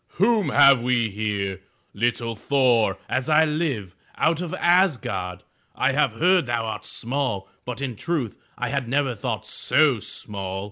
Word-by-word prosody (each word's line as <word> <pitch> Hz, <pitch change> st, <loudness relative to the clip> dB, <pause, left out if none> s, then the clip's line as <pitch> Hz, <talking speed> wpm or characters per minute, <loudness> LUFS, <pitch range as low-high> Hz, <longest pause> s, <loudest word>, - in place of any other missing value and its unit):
*'Whom 210 Hz, +1 st, +3 dB
have 140 Hz, -3 st, +6 dB
we 120 Hz, -3 st, +1 dB
here? 100 Hz, -2 st, -3 dB, 0.3 s
Little 115 Hz, +1 st, -1 dB
Thor, 115 Hz, -4 st, +2 dB
as 130 Hz, +2 st, -2 dB
I 155 Hz, +1 st, +5 dB
live, 145 Hz, -, -2 dB, 0.2 s
out 165 Hz, +1 st, +1 dB
of 175 Hz, -3 st, -4 dB
Asgard. 120 Hz, -, +1 dB, 0.3 s
I -, -, +2 dB
have -, -, +1 dB
heard 175 Hz, +4 st, +3 dB
thou 120 Hz, -1 st, -1 dB
art 110 Hz, -, -5 dB
small, 120 Hz, -6 st, -2 dB, 0.2 s
but 125 Hz, +2 st, -5 dB
in 125 Hz, -4 st, -3 dB
truth 145 Hz, -4 st, -2 dB, 0.2 s
I 125 Hz, 0 st, -2 dB
had 140 Hz, -3 st, -2 dB
never 135 Hz, -1 st, +1 dB
thought 105 Hz, -, -4 dB
so 145 Hz, -7 st, +2 dB
small! 95 Hz, -2 st, -5 dB
125 Hz, 150 wpm, -24 LUFS, 105-150 Hz, 0.3 s, have